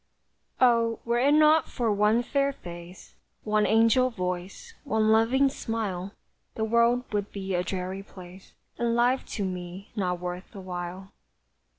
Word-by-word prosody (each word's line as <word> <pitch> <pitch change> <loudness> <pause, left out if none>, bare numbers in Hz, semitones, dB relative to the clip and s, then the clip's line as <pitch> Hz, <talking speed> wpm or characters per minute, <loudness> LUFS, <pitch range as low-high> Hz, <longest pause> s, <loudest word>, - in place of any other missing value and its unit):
Oh, 230 -2 +3
were 235 0 +1
it 280 +4 +4
not 310 +1 +5
for 235 -4 -1
one 210 +3 +3
fair 280 +2 +1
face, 175 -6 -11 0.3
One 215 0 +2
angel 230 +3 +4
voice, 185 - -5
one 220 -6 +1
loving 235 +5 +4
smile, 210 -7 -4 0.4
The 220 - -2
world 235 +2 +3
would 205 -1 -2
be 195 -1 -4
a 175 - +1
dreary 185 +1 -4
place, 185 -1 -13 0.3
And 235 -1 +1
life 245 +2 +2
to 200 - -1
me 180 +1 -6
not 180 -4 -1
worth 180 +3 -6
the 200 - -9
while. 185 +1 -6
215 Hz, 150 wpm, -27 LUFS, 185-235 Hz, 0.4 s, not